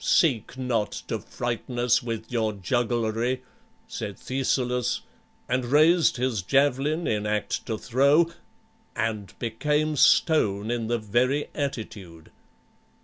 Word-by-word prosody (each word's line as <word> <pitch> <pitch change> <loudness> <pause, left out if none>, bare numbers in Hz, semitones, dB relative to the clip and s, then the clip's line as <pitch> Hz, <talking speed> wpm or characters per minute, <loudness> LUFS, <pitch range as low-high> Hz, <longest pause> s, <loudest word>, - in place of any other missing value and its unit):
"Seek 130 -6 +2
not 120 -5 -1 0.2
to - - -1
frighten 120 0 -4
us 120 0 +3
with 115 -1 -5
your 110 -3 0
jugglery," 120 +4 -1 0.4
said 105 - -6
Thescelus, 125 -2 -1 0.5
and 125 0 0
raised 155 +5 +4
his 125 -5 0
javelin 140 - +1
in 105 -1 -1
act 105 0 -2
to 110 - -2
throw, 140 +9 +3 0.6
and 105 -4 -3
became 150 +7 0
stone 110 - +3
in 120 -2 -2
the 120 +1 +1
very 120 +7 0
attitude. 105 - -6
120 Hz, 115 wpm, -26 LUFS, 110-135 Hz, 0.6 s, raised